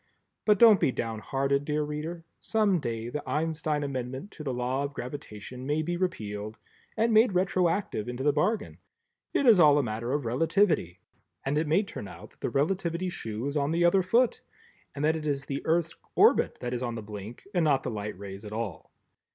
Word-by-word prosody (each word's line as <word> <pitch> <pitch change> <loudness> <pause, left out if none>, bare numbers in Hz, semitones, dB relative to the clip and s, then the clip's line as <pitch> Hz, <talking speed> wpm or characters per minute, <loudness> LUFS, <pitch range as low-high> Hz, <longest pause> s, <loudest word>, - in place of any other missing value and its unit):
But 210 -1 +5
don't 220 -3 +8
be 155 -6 +2
down 115 -3 -3
hearted, 140 +4 0
dear 150 +1 0
Reader, 155 +3 -5
some 210 -5 +2
day 115 -4 -3
the 150 +4 -3
Einstein 155 -1 -1
Amendment 130 +6 -4
to 150 - -9
the 135 - -2
Law 125 +2 -1
of 140 0 -5
Gravitation 125 -1 -7
may 150 +2 +1
be 175 +2 -2
repealed, 110 - -3 0.4
and 225 +1 +2
made 220 -1 +5
retroactive 180 - 0
into 125 +2 -4
the 145 0 +3
bargain; 210 +8 0 0.5
it 280 - +1
is 225 -6 +7
all 150 -3 +7
a 145 - +3
matter 115 +1 -3
of 145 -2 -1
Relativity 155 - +2 0.5
and 135 +2 0
it 155 +1 +1
may 170 +8 +3
turn 150 - -7
out - - -11
that - - -28
the - - -1
Relativity 170 +4 0
shoe 110 -7 -5
is 140 +1 -2
on 145 -1 +1
the 170 +2 +2
other 190 +2 +5
foot 230 +7 +2 0.5
and 145 +1 -1
that 160 +1 +3
it 155 -1 -4
is 140 -1 -1
the 140 0 -4
Earth's 165 0 +2 0.2
orbit - - +4
that 120 0 -3
is 125 - -2
on 120 -2 -2
the 110 - -6
blink 105 +2 -8
and 175 -3 +2
not 140 -4 +3
the - - -3
light 105 -2 -5
rays 100 +1 -8
at 105 - -8
all. 110 -6 -5
145 Hz, 205 wpm, -28 LUFS, 120-170 Hz, 0.5 s, don't